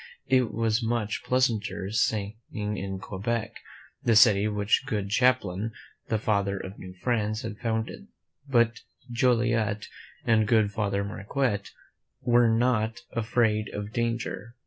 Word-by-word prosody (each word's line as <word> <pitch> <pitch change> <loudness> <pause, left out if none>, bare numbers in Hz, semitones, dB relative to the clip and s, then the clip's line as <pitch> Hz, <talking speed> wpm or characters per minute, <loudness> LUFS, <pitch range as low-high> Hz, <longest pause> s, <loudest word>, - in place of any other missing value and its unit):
It 130 -2 +2
was 115 0 +1
much 115 -2 -1
pleasanter 110 -6 0
staying 105 -1 0 0.2
in 105 -2 -3
Quebec, 110 +4 -3 0.5
the 115 - +3
city 105 -2 +6
which 105 -1 +1
good 100 -2 -2
Champlain, 110 -3 +2 0.3
the 110 - +1
Father 100 -2 0
of 95 +1 -8
New 95 0 -9
France, 110 -2 0
had 110 -3 -6
founded; 115 - -3 0.4
but 120 -2 +3 0.3
Joliet 115 -3 +1 0.4
and 110 -2 +3
good 110 -2 +3
Father 100 -1 -1
Marquette 105 +2 -2 0.5
were 120 -1 +4
not 115 -1 +1
afraid 110 -2 +1
of 105 +1 -5
danger. 115 -2 -2
110 Hz, 125 wpm, -27 LUFS, 105-120 Hz, 0.5 s, city